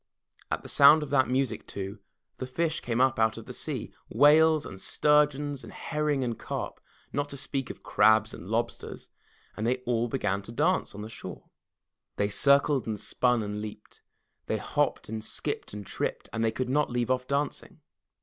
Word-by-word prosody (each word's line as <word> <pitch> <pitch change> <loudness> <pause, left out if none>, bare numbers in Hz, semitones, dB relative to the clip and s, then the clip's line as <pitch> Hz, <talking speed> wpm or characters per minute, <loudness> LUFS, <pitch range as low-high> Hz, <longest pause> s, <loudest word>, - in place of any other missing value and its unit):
At - - -2
the - - -9
sound 150 +2 +7
of 145 - -7
that 130 -2 +4
music 130 0 -1
too, 100 +1 -6 0.4
the 130 - -4
fish 155 +4 -1
came 120 0 -2
up 130 -2 +3
out 110 0 +2
of - - -8
the - - -8
sea, - - -5 0.2
whales 155 +1 +5
and 95 0 -8
sturgeons 145 -2 +2
and - - -10
herring 150 -3 -1
and 120 -2 -3
carp, - - -5 0.3
not 145 0 -1
to 140 - -6
speak 135 0 -3
of - - -9
crabs 110 0 +4
and 90 - -9
lobsters, 115 +1 -3 0.4
and 110 - -2
they 125 - +3
all 120 -1 +1
began 105 -6 -1
to 100 - -10
dance 155 - +1
on 105 - -6
the - - -6
shore. 95 -5 -9 0.6
They 100 0 0
circled 140 +4 +4
and 110 -2 -3
spun 125 0 +1
and 105 0 -4
leaped. 105 0 -9 0.5
They - - 0
hopped - - -1
and 110 0 -5
skipped - - -4
and 105 -1 -7
tripped. - - -3
And 115 0 -1
they 110 - +2
could 125 +3 -3
not 145 +3 +1
leave 120 +1 -1
off 125 0 0
dancing. 140 +1 -2
125 Hz, 190 wpm, -28 LUFS, 110-145 Hz, 0.6 s, sound